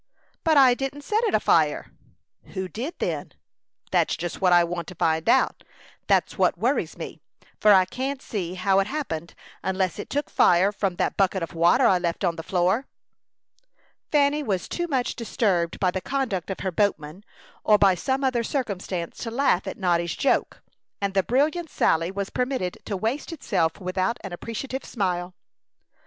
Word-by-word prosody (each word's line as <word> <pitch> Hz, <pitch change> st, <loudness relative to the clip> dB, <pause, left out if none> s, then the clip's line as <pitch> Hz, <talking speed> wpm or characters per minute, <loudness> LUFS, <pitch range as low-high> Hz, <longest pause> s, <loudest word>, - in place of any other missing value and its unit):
"But 320 Hz, -3 st, +4 dB
I 260 Hz, -3 st, +7 dB
didn't 270 Hz, +3 st, -4 dB
set 430 Hz, +8 st, 0 dB
it 430 Hz, -, +1 dB
afire." -, -, +2 dB, 0.6 s
"Who 190 Hz, 0 st, -2 dB
did, 250 Hz, -, -5 dB
then?" -, -, -3 dB, 0.6 s
"That's -, -, +2 dB
just 175 Hz, +2 st, -5 dB
what 185 Hz, -1 st, +4 dB
I 175 Hz, 0 st, +6 dB
want 170 Hz, 0 st, -4 dB
to 185 Hz, -, -9 dB
find 160 Hz, 0 st, +1 dB
out. -, -, +3 dB, 0.4 s
That's -, -, +1 dB
what -, -, +3 dB
worries -, -, 0 dB
me; -, -, -7 dB, 0.4 s
for 210 Hz, -, +6 dB
I 190 Hz, -2 st, +6 dB
can't 265 Hz, +7 st, -4 dB
see 185 Hz, -8 st, -4 dB
how 190 Hz, +1 st, +2 dB
it 195 Hz, -, +1 dB
happened, 170 Hz, -, -4 dB, 0.3 s
unless 190 Hz, 0 st, -1 dB
it -, -, -6 dB
took 290 Hz, +1 st, -2 dB
fire 180 Hz, +3 st, +4 dB
from 195 Hz, -3 st, -2 dB
that 185 Hz, -, -1 dB
bucket 190 Hz, -2 st, +1 dB
of 165 Hz, -, -6 dB
water 170 Hz, +1 st, +4 dB
I 185 Hz, -, +4 dB
left 175 Hz, +2 st, -2 dB
on 175 Hz, -2 st, +1 dB
the 165 Hz, -, -5 dB
floor." 185 Hz, +9 st, 0 dB, 1.2 s
Fanny 290 Hz, 0 st, +3 dB
was 195 Hz, -10 st, -2 dB
too 345 Hz, 0 st, -3 dB
much 260 Hz, -6 st, -1 dB
disturbed 195 Hz, -7 st, 0 dB
by 185 Hz, -2 st, +2 dB
the 190 Hz, -, -3 dB
conduct 245 Hz, -10 st, -2 dB
of 195 Hz, -, -4 dB
her 190 Hz, -, -1 dB
boatman, 180 Hz, -2 st, -1 dB, 0.4 s
or 210 Hz, -, +5 dB
by 200 Hz, -2 st, +5 dB
some 265 Hz, +8 st, -1 dB
other 255 Hz, -3 st, +1 dB
circumstance, 195 Hz, -, -3 dB
to 230 Hz, -, -4 dB
laugh 230 Hz, -6 st, +1 dB
at 190 Hz, -, -5 dB
Noddy's 170 Hz, -3 st, 0 dB
joke; 275 Hz, -, 0 dB, 0.4 s
and 200 Hz, -1 st, -1 dB
the 195 Hz, -, +3 dB
brilliant 300 Hz, -, 0 dB
sally 165 Hz, +1 st, +1 dB
was 195 Hz, +1 st, -4 dB
permitted 250 Hz, -8 st, -2 dB
to 200 Hz, -, -3 dB
waste 230 Hz, -, -2 dB
itself 165 Hz, -, -1 dB
without 185 Hz, +3 st, -1 dB
an 195 Hz, -3 st, -6 dB
appreciative 255 Hz, +8 st, -5 dB
smile. 180 Hz, -4 st, -2 dB
195 Hz, 175 wpm, -25 LUFS, 180-260 Hz, 1.2 s, I